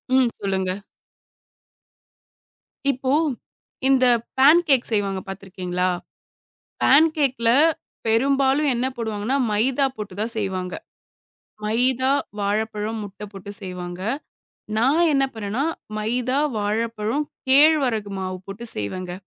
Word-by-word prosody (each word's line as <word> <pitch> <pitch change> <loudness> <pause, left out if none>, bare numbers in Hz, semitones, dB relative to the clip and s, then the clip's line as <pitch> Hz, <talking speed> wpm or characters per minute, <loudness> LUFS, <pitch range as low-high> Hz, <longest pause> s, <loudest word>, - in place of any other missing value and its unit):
ம். 260 -2 +4
சொல்லுங்க. 190 -2 -1 2.2
இப்போ, 260 0 -2 0.8
இந்த 265 -1 +4 0.3
பேன்கேக் 285 -2 +5
செய்வாங்க 200 -3 0
பாத்துருக்கீங்களா? 185 -2 -3 1.0
பேன்கேக்ல 280 -5 +4 0.6
பெரும்பாலும் 275 +5 +3
என்ன 240 +2 0
போடுவாங்கன்னா, 220 +3 -1
மைதா 255 +6 +2
போட்டுத் 205 -3 -7
தான் 230 +2 -1
செய்வாங்க. 185 -3 -2 0.9
மைதா, 250 +4 +2 0.3
வாழப்பழம், 210 +2 -1
முட்ட 200 0 -9
போட்டுச் 200 +1 -7
செய்வாங்க. 180 -1 -6 0.8
நான் 270 +9 +3
என்ன 275 -1 +3
பண்ணனா 220 +4 -2 0.3
மைதா, 245 +4 -1 0.2
வாழைப்பழம், 220 +5 -1 0.2
கேழ்வரகு 265 -7 +4
மாவு 185 -1 -4
போட்டு 200 +4 -8
செய்வேங்க. 175 - -4
220 Hz, 90 wpm, -23 LUFS, 200-265 Hz, 2.2 s, பேன்கேக்